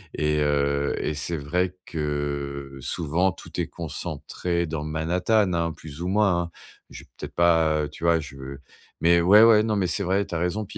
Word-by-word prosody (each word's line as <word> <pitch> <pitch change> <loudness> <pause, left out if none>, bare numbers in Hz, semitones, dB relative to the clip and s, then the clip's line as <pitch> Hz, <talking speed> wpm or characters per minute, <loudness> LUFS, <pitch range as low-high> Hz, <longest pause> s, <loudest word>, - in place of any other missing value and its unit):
et 75 -1 +1
heu 70 -1 +1
et - - -2
c'est 75 +3 -3
vrai 90 +5 -1
que, 70 -2 -4
souvent, 85 +7 0
tout - - -9
est - - 0
concentré 85 -1 -3
dans 80 -2 -4
Manhattan, 90 +6 +1
hein, 85 -1 0
plus 80 0 -10
ou 90 - -2
moins, 95 -3 +2
hein. 85 - -8 0.4
Je - - -10
vais - - -23
peut-être, - - -8
pas 80 -3 +3
heu, 75 - -4
tu 80 +3 -7
vois? 85 -1 +4
Je 70 -1 -10 0.6
mais 85 +1 +5
ouais, 100 +6 +7
ouais, 115 -2 +7
non 110 -1 0
mais 95 -3 +1
c'est 100 +3 -1
vrai, 95 +2 +1
tu 85 - -6
as - - +1
raison, 90 +5 -1
puis - - -9
85 Hz, 200 wpm, -25 LUFS, 75-90 Hz, 0.6 s, ouais